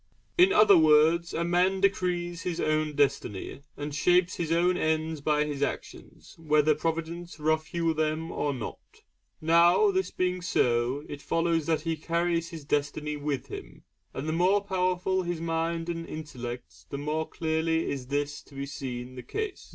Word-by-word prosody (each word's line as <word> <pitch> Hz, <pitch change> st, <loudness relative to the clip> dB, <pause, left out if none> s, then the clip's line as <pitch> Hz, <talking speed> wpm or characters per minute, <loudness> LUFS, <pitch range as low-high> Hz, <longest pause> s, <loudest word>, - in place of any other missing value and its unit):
In 365 Hz, +2 st, +6 dB
other 205 Hz, -, +7 dB
words, 160 Hz, +2 st, +4 dB
a 170 Hz, -, -1 dB
man 180 Hz, +3 st, +2 dB
decrees 180 Hz, -3 st, 0 dB
his 175 Hz, -2 st, -3 dB
own 155 Hz, -1 st, 0 dB
destiny 140 Hz, -6 st, -1 dB, 0.2 s
and 145 Hz, 0 st, -5 dB
shapes 180 Hz, +5 st, +3 dB
his 165 Hz, -2 st, -2 dB
own 175 Hz, +2 st, +3 dB
ends 160 Hz, -2 st, -1 dB
by 150 Hz, 0 st, +2 dB
his 145 Hz, -2 st, -4 dB
actions, -, -, -5 dB
whether 155 Hz, -1 st, +3 dB
Providence 165 Hz, +2 st, -4 dB
rough 155 Hz, +1 st, +1 dB
hew 165 Hz, -1 st, 0 dB
them 155 Hz, +1 st, -1 dB
or 145 Hz, -, -1 dB
not. 125 Hz, -5 st, -5 dB, 0.6 s
Now 170 Hz, -, +5 dB
this 380 Hz, 0 st, 0 dB
being 180 Hz, 0 st, -1 dB
so, 125 Hz, -4 st, +1 dB
it 145 Hz, -, -7 dB
follows 165 Hz, +1 st, 0 dB
that 160 Hz, -2 st, +1 dB
he 165 Hz, +1 st, -1 dB
carries 170 Hz, +1 st, -1 dB
his 160 Hz, -4 st, -9 dB
destiny 150 Hz, +1 st, -1 dB
with 145 Hz, -3 st, -3 dB
him, -, -, -10 dB, 0.3 s
and 135 Hz, +4 st, -5 dB
the 155 Hz, -, 0 dB
more 185 Hz, +4 st, +3 dB
powerful 185 Hz, 0 st, 0 dB
his 175 Hz, -2 st, -3 dB
mind 165 Hz, 0 st, -1 dB
and 165 Hz, -1 st, -4 dB
intellect 120 Hz, -, -8 dB
the 140 Hz, -, -4 dB
more 150 Hz, +2 st, -2 dB
clearly 160 Hz, 0 st, 0 dB
is 130 Hz, -3 st, -4 dB
this 145 Hz, +1 st, -1 dB
seen 135 Hz, -3 st, -6 dB
to -, -, -12 dB
be -, -, -13 dB
the -, -, -5 dB
case. 430 Hz, -2 st, -4 dB
160 Hz, 165 wpm, -28 LUFS, 145-175 Hz, 0.6 s, other